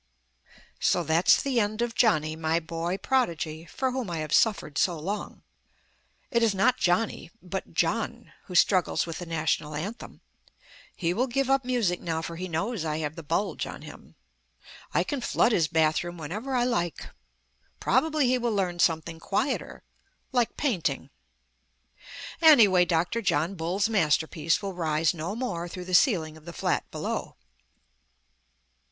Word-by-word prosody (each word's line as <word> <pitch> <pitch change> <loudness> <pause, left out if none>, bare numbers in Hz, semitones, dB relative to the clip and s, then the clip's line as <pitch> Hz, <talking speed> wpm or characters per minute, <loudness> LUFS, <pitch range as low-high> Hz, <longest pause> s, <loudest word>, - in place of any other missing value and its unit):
So - - +2
that's 160 +3 +4
the 265 -4 +1
end 215 0 -1
of 240 -1 -2
Johnny, 155 -11 +2
my 160 +1 0
boy 170 +2 -3
prodigy, 170 - -1
for 260 +10 -2
whom 250 -6 -3
I 170 - -3
have 155 0 -3
suffered 200 -9 +2
so 175 -3 +2
long. 195 +7 -5 0.9
It 235 -2 +2
is 220 -3 +2
not 250 +7 +3
Johnny 180 +1 0
but 185 -3 -6
Jno. 230 +7 -1
who 180 - -8
struggles 180 0 +3
with 165 -1 -6
the 175 - -7
National 155 -2 -1
Anthem. 200 +11 -6 0.7
He 170 -1 -1
will 245 +7 0
give 270 +2 0
up 270 0 +3
music 235 -8 0
now, 160 -1 -2
for 170 - -5
he 185 +2 -5
knows 185 +4 -2
I 155 -1 -2
have 155 -1 -3
the 165 - -7
bulge 165 +7 -2
on - - -9
him; - - -13 0.8
I - - +2
can 285 -4 -3
flood 235 - +2
his 170 -8 +2
bathroom 160 +2 +1
whenever 210 - -4
I 245 - +3
like. 175 -9 -2 0.7
Probably 300 +2 +2
he 255 0 +2
will 235 -3 -1
learn 180 -3 -1
something 165 -1 +1
quieter 255 - -2 0.5
like 245 -3 0
painting. 165 - -1 1.3
Anyway, 215 - +7
Dr. 175 +7 0
John 170 -2 +1
Bull's 185 +4 0
masterpiece 160 -3 +1
will 195 -1 -3
rise 160 -2 +1
no 170 +5 -4
more 180 -9 -3
through 180 +1 -7
the 185 - -6
ceiling 165 - +3
of 155 - -18
the 170 - -8
flat - - -1
below. - - -4
180 Hz, 155 wpm, -27 LUFS, 160-230 Hz, 1.3 s, Anyway